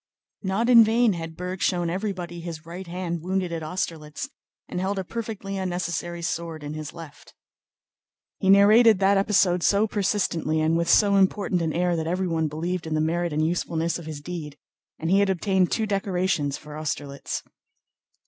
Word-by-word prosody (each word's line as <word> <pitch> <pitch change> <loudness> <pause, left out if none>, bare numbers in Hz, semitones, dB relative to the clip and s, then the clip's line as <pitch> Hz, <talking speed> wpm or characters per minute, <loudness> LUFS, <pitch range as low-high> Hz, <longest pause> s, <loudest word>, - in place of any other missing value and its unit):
Not 195 +4 0
in 235 -2 +9
vain 225 0 +3
had 165 -2 -6
Berg 180 +1 -5
shown 175 -2 +1
everybody 180 -3 -4
his 165 -2 -7
right 175 +2 -8
hand 170 -1 -4
wounded 185 0 -1
at 165 -1 -3
Austerlitz 155 -2 -4 0.4
and - - -4
held 195 +1 -1
a 190 - -1
perfectly 210 -1 -5
unnecessary 175 -2 -3
sword 165 -2 -3
in 145 +1 -5
his 155 -1 -6
left. 165 -3 -12 1.0
He 190 - +1
narrated 210 +3 +7
that 195 +1 +3
episode 190 -3 +3
so 200 +5 +3
persistently 195 -7 0
and 160 +1 +2
with 170 0 0
so 200 +2 +5
important 190 -1 +2
an 160 -1 0
air 175 +2 +1
that 160 -1 -2
everyone 170 -3 0
believed 165 +3 -3
in 155 - -1
the - - +1
merit 170 +2 0
and 155 +1 +1
usefulness 170 0 -1
of 165 - -10
his 150 -2 -6
deed, 150 -3 -6 0.4
and 160 +2 -2
he 195 - +5
had 200 -1 +3
obtained 190 0 +1
two 220 - +1
decorations 185 -7 0
for 150 0 -11
Austerlitz. 145 -2 -4
175 Hz, 175 wpm, -25 LUFS, 160-195 Hz, 1.0 s, in